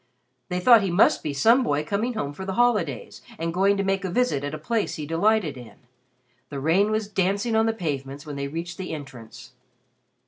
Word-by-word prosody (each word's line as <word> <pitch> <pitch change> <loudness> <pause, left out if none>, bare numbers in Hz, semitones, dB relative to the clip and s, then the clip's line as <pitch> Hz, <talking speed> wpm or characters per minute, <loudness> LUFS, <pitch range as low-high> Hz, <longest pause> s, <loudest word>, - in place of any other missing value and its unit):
They 180 -1 -1
thought 230 +4 +7
he 195 - -1
must 175 +4 +4
be 150 - -3
some 225 - +4
boy 150 - 0
coming 210 +10 -2
home 145 -10 -3
for 190 - -8
the 190 0 -4
holidays 210 - 0 0.2
and 165 0 -3
going 195 +3 +2
to 195 - 0
make 195 0 0
a 190 - -2
visit 180 - 0
at 145 +1 -3
a - - -5
place 220 +8 -2
he 150 - -5
delighted 165 -1 +1
in. 120 -2 -12 0.7
The 140 - -5
rain 170 +9 +2
was 215 -1 -1
dancing 200 +3 0
on 220 0 +3
the - - +3
pavements 145 -7 -5
when 150 -2 -6
they 140 0 -3
reached 170 +4 -6
the 180 -4 -4
entrance. 130 -6 -11
180 Hz, 210 wpm, -24 LUFS, 145-210 Hz, 0.7 s, thought